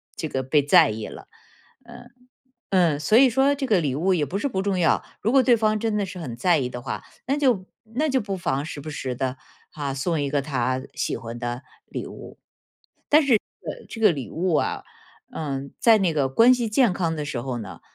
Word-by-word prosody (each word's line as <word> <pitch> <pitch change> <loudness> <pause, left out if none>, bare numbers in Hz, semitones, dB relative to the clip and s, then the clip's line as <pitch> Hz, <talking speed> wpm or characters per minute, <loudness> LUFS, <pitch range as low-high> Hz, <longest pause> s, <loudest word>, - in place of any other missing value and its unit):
这 160 - -4
个 130 0 -2
被 145 +3 +3
在 155 - +5
意 110 0 -5
了。 - - -11 0.6
嗯， 245 - -13 0.6
嗯， 170 -6 +3
所 185 +9 +3
以 260 0 +7
说 270 +3 +3
这 280 - -4
个 205 -7 +3
礼 140 -5 -1
物 180 +7 +1
也 155 -5 +1
不 185 +9 -3
是 280 - -1
不 190 -6 -2
重 195 -1 0
要， 170 -3 +2 0.2
如 220 - +1
果 270 -1 +6
对 240 -1 +5
方 215 -1 +1
真 220 0 -1
的 205 - 0
是 185 -1 -8
很 125 -8 -6
在 170 +6 +3
意 125 -3 -1
的 125 -1 -7
话， 130 - -5 0.2
那 275 +3 +1
就 250 -10 +2 0.3
那 305 +5 +1
就 265 -2 +2
不 200 -3 -4
妨 140 -5 -1
时 150 -2 -7
不 155 - -7
时 130 -4 -4
地， 130 +1 -2 0.4
啊， 145 -4 -4
送 155 +4 -1
一 140 - -1
个 140 -1 0
他 130 -2 -1
喜 - - -2
欢 115 +1 -7
的 120 +2 -4 0.2
礼 - - -5
物。 - - -11 0.7
但 305 +1 +6
是 275 - -4
这 220 - +6 0.3
个 - - -10
这 225 - -8
个 210 -5 +6
礼 135 -7 -6
物 180 +2 -1
啊， - - 0 0.5
嗯， 140 -3 -4
在 230 -2 +6
那 180 -4 +1
个 140 -3 +1
关 230 - +6
系 240 -3 -2
健 220 -2 +3
康 165 -3 -1
的 150 - -3
时 135 -4 -4
候 125 0 -4
呢， 105 -5 -8
165 Hz, 245 characters per minute, -24 LUFS, 135-215 Hz, 0.7 s, 以